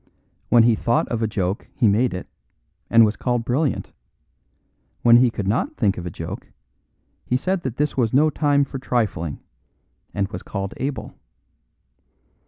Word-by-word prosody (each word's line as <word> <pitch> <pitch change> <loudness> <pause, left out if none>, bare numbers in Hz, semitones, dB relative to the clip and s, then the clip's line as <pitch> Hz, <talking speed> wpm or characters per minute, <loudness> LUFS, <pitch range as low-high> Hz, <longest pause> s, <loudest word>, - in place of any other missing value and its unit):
When 120 -1 +6
he 115 0 +5
thought 115 +2 +1
of 115 -1 -2
a 110 - +1
joke 100 -2 -2
he 115 - +3
made 115 +5 +3
it, 90 - -6 0.6
and 115 -1 +7
was 105 - -1
called 120 -2 -1
brilliant. 135 +4 -1 1.1
When 120 0 +8
he 125 0 +5
could 105 -4 -4
not 105 +5 -1
think 100 -4 +2
of 90 - -6
a - - -2
joke - - -7 0.8
he 125 - 0
said 185 +6 -1
that 130 -7 -4
this 150 0 -1
was 115 -4 +2
no 150 +4 +4
time 145 -2 +2
for 135 -1 -6
trifling, 105 - -2 0.7
and 100 -1 -1
was 90 -2 -6
called 100 0 -5
able. 135 +1 -4
115 Hz, 165 wpm, -22 LUFS, 105-130 Hz, 1.1 s, When